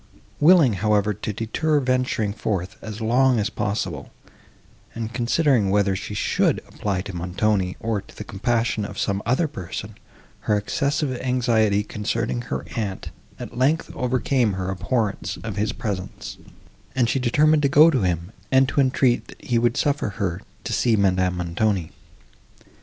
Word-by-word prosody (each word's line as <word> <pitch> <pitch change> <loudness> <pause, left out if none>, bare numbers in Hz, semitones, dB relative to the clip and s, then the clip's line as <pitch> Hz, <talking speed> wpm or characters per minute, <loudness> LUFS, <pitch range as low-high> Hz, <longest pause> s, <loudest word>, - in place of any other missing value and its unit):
Willing, 150 - +6
however, 105 -1 +2
to 105 +1 -4
defer 145 +9 0
venturing 125 -5 0
forth, 95 -4 -3
as 110 0 -7
long 125 +3 +3
as 105 +1 0
possible, 95 -8 -3 0.8
and 115 0 -4
considering, 125 -2 +2
whether 100 -1 +2
she 105 +2 -5
should - - +1
apply 100 -3 -2
to 95 -1 -7
Montoni, 90 +2 0
or 110 -3 -1
to - - -18
the - - -5
compassion 115 +2 -1
of 100 - -6
some 100 0 -1
other 130 +8 +2
person, 105 - -7 0.5
her 105 - +1
excessive 140 +6 -1
anxiety 115 -5 +2
concerning 100 - -2
her 65 +3 -4
aunt, 100 -4 -4 0.3
at - - -8
length, 150 +5 +1
overcame 125 -2 +1
her 95 0 -3
abhorrence 105 +1 -2
of - - -4
his 105 +2 0
presence, 100 -5 -5 0.6
and 125 -3 +3
she 135 - 0
determined 150 +5 +3
to 140 - +2
go 155 +4 +7
to 130 - +1
him, 90 0 -1 0.2
and 135 0 +5
to 145 - +2
entreat, 130 -2 +2
that - - -13
he 120 -2 +2
would 120 0 +1
suffer 145 -6 +1
her 95 -3 -2 0.2
to - - -3
see 115 -2 +3
Madame 95 -3 +2
Montoni. 90 0 -1
110 Hz, 155 wpm, -23 LUFS, 100-130 Hz, 0.8 s, go